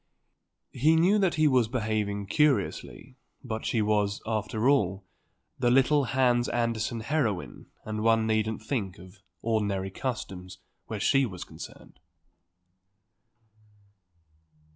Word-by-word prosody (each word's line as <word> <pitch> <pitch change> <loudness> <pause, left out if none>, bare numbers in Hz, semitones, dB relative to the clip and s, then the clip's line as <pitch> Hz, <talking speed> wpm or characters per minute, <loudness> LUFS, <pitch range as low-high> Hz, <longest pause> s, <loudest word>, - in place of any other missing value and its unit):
He 155 +6 +3
knew 185 +6 +4
that 190 -4 +2
he 155 -1 +4
was 130 -5 +3
behaving 110 -4 -2
curiously; 130 - 0 0.3
but 110 -4 -4
she 110 -3 +1
was, 105 -1 +1
after 110 +1 -1
all, 100 -9 +2 0.5
the 120 -2 +2
little 135 +3 +4
Hans 120 -1 +2
Andersen 115 -1 -1
heroine 115 - -2 0.2
and 110 0 -3
one 115 0 +3
needn't 110 0 -1
think 110 -6 -3
of 90 +1 -15 0.2
ordinary 100 -4 -1
customs 95 -6 -5 0.3
where - - -4
she 135 -1 +3
was 90 -4 -7
concerned. - - -12
110 Hz, 115 wpm, -28 LUFS, 105-130 Hz, 0.5 s, knew